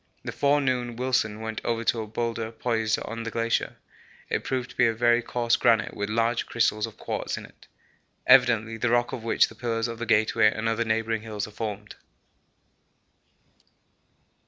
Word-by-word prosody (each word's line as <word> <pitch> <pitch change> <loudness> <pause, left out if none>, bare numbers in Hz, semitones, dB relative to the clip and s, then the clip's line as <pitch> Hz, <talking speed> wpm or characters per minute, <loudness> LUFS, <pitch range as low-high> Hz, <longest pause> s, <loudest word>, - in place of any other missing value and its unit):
This - - -5
forenoon 130 -4 +1
Wilson 120 -4 0
went 110 0 -4
over 115 -1 -1
to 115 0 +1
a 110 - -6
boulder 115 0 -3
poised 110 -1 0
on 115 0 -5
the 115 - -4
glacier. 115 0 -1 0.6
It - - 0
proved 130 -1 -3
to - - -16
be 120 - +4
a 115 - 0
very 120 +1 +3
coarse 120 0 +1
granite 115 -4 +2
with 100 0 -3
large 115 +2 0
crystals 115 -2 +1
of 110 - -13
quartz - - -3
in - - -7
it. - - -19 0.6
Evidently 115 -3 +5
the 120 +1 0
rock 120 0 +1
of 115 - -5
which 115 - +3
the - - -13
pillars 115 0 -2
of 115 -1 -6
the 120 - -4
Gateway 110 -1 +4
and 110 0 -3
other 115 +1 0
neighbouring 110 0 0
hills 105 -2 -4
are - - -12
formed. 105 -1 -6
115 Hz, 180 wpm, -26 LUFS, 110-120 Hz, 0.6 s, Evidently